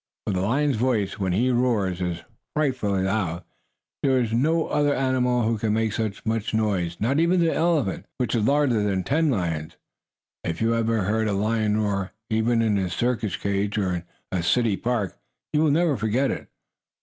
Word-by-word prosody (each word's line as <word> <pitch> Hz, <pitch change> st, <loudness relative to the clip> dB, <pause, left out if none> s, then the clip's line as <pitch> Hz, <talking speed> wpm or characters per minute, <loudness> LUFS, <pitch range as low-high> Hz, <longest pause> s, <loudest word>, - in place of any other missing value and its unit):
For 105 Hz, -, -1 dB
the 90 Hz, -, 0 dB
lion's 135 Hz, +6 st, +1 dB
voice, 110 Hz, -5 st, 0 dB
when 95 Hz, -2 st, 0 dB
he 120 Hz, +8 st, +2 dB
roars, 110 Hz, -7 st, +1 dB
is 85 Hz, -1 st, -3 dB, 0.3 s
frightfully 125 Hz, -10 st, 0 dB
loud. 95 Hz, -4 st, -1 dB, 0.6 s
There 130 Hz, -2 st, +3 dB
is 115 Hz, -3 st, -1 dB
no 155 Hz, +7 st, +2 dB
other 145 Hz, -1 st, +1 dB
animal 125 Hz, -2 st, +1 dB
who 110 Hz, 0 st, 0 dB
can 105 Hz, 0 st, 0 dB
make 110 Hz, -1 st, 0 dB
so 110 Hz, -1 st, 0 dB, 0.2 s
much 110 Hz, 0 st, -1 dB
noise 95 Hz, -6 st, 0 dB
not 135 Hz, +7 st, +1 dB
even 170 Hz, +2 st, +3 dB
the 165 Hz, -1 st, +2 dB
elephant, 160 Hz, -, 0 dB
which 125 Hz, -4 st, -1 dB
is 115 Hz, -3 st, +1 dB
larger 135 Hz, -3 st, +3 dB
than 100 Hz, -2 st, 0 dB
ten 155 Hz, -, +1 dB
lions. 85 Hz, -, -2 dB, 0.7 s
If 80 Hz, 0 st, -3 dB
you 115 Hz, +1 st, +2 dB
have 115 Hz, -1 st, +1 dB
ever 115 Hz, -3 st, +1 dB
heard 110 Hz, +3 st, 0 dB
a 105 Hz, -, 0 dB
lion 105 Hz, +1 st, +1 dB
roar, 100 Hz, -3 st, -1 dB, 0.2 s
even 115 Hz, +1 st, +2 dB
in 105 Hz, -2 st, +2 dB
his 95 Hz, -2 st, -1 dB
circus 115 Hz, -5 st, 0 dB
cage, 100 Hz, +1 st, -1 dB
or 95 Hz, -3 st, 0 dB
in 85 Hz, -1 st, -3 dB, 0.3 s
a 90 Hz, -, 0 dB
city 110 Hz, +4 st, +2 dB
park, 115 Hz, -4 st, -2 dB, 0.3 s
you 150 Hz, -, +3 dB
will 155 Hz, -, +4 dB
never 160 Hz, 0 st, +2 dB
forget 120 Hz, +4 st, +1 dB
it. -, -, -5 dB
110 Hz, 190 wpm, -24 LUFS, 100-130 Hz, 0.7 s, will